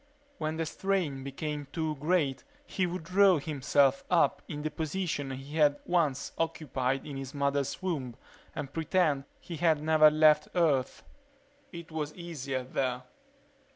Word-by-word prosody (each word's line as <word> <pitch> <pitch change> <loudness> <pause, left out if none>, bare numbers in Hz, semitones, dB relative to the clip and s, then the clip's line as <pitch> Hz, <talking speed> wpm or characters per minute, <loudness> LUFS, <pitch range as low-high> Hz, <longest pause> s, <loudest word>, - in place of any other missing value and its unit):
When 155 +1 -2
the 165 - -1
strain 170 -6 -1
became 145 +1 -4
too 160 -2 -1
great 150 -3 0 0.2
he 185 -8 -1
would 175 -1 -5
draw 185 +1 +5
himself 140 -2 +2
up 175 - +3
in 150 -1 -5
the 155 - -2
position 155 -2 -2
he 135 +4 -6
had 145 -2 +4
once 155 -6 0
occupied 135 -5 -1
in 140 -2 -6
his 135 +1 -7
mother's 140 +3 -1
womb 140 -10 -2 0.4
and 140 -1 -5
pretend 160 -4 +1
he 170 - -7
had 155 -2 +2
never 155 -1 +6
left 155 0 +5
Earth. 145 -7 +1 0.7
It 170 -3 -9
was 155 -1 -4
easier 140 -7 -4
there. 125 0 -2
150 Hz, 145 wpm, -30 LUFS, 140-165 Hz, 0.7 s, never